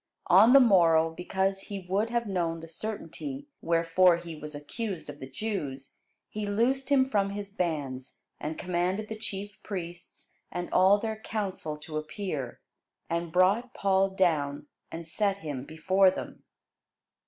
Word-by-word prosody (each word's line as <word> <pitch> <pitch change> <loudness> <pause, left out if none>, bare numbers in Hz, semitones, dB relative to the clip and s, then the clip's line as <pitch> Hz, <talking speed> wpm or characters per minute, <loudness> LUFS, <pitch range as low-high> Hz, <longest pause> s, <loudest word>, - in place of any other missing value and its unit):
On 210 +7 +8
the 275 - +10
morrow, 165 -9 +5
because 190 +3 -1
he 195 -2 -7
would 200 +5 +1
have 235 0 0
known 170 -5 -1
the 165 - -9
certainty 220 - -6
wherefore 170 +1 +4
he 170 -1 -8
was 150 0 -7
accused 180 +2 -5
of 145 - -14
the 130 - -8
Jews, 140 -6 -4 0.3
he 210 -1 -4
loosed 255 +6 +1
him 265 -2 +4
from 200 -6 +1
his 200 0 -6
bands, 145 -9 -3 0.2
and 155 +1 -4
commanded 185 +4 -1
the 220 - -4
chief 205 -2 -6
priests 175 -3 -7 0.2
and 175 0 -4
all 190 +2 +6
their 220 +1 -3
council 190 -9 -3
to 155 +1 -6
appear, 155 - -4 0.5
and 170 0 -1
brought 200 +8 +3
Paul 195 0 +3
down, 155 -7 +1 0.3
and 165 0 -6
set 195 +4 0
him 145 -8 -5
before 185 +5 +3
them. 185 - -6
185 Hz, 150 wpm, -29 LUFS, 165-205 Hz, 0.5 s, the